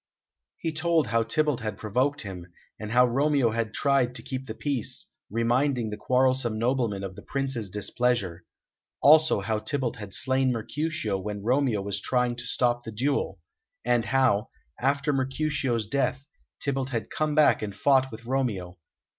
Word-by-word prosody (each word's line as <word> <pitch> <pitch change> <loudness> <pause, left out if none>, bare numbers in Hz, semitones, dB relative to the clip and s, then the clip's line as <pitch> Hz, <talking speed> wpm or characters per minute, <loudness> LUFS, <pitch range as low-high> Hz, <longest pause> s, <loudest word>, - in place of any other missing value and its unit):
He 165 - -2
told 160 0 +2
how 115 0 +2
Tybalt 145 +4 +1
had 110 -3 -4
provoked 130 +7 0
him, 90 -4 -8 0.3
and 105 - -5
how 125 +2 +6
Romeo 135 -1 +2
had 115 -1 -2
tried 130 -1 +1
to - - -7
keep 130 0 -5
the - - -6
peace, 140 -6 -2 0.2
reminding 120 +1 +1
the - - -3
quarrelsome 130 0 +2
nobleman 115 -4 0
of 95 -1 -6
the - - -10
Prince's 135 -7 -2
displeasure; 105 -2 -1 0.6
also 155 -5 +6
how 105 +2 -1
Tybalt 130 0 -2
had 105 -3 -5
slain 130 0 +2
Mercutio 120 - -2
when 105 +1 -5
Romeo 125 -3 +1
was 100 0 -2
trying 125 0 +1
to 120 0 -6
stop 120 -1 +1
the 115 - -7
duel; 120 - -1 0.4
and 120 -2 +2
how, 130 -6 +2 0.3
after 140 +2 +1
Mercutio's 135 -3 -1
death, 130 +3 -1 0.3
Tybalt 135 -1 -1
had 115 -4 -4
come 155 -1 -1
back 155 -1 +5
and 100 -2 -4
fought 130 +4 +3
with 115 +1 -10
Romeo. 105 -9 -2
125 Hz, 160 wpm, -27 LUFS, 110-135 Hz, 0.6 s, how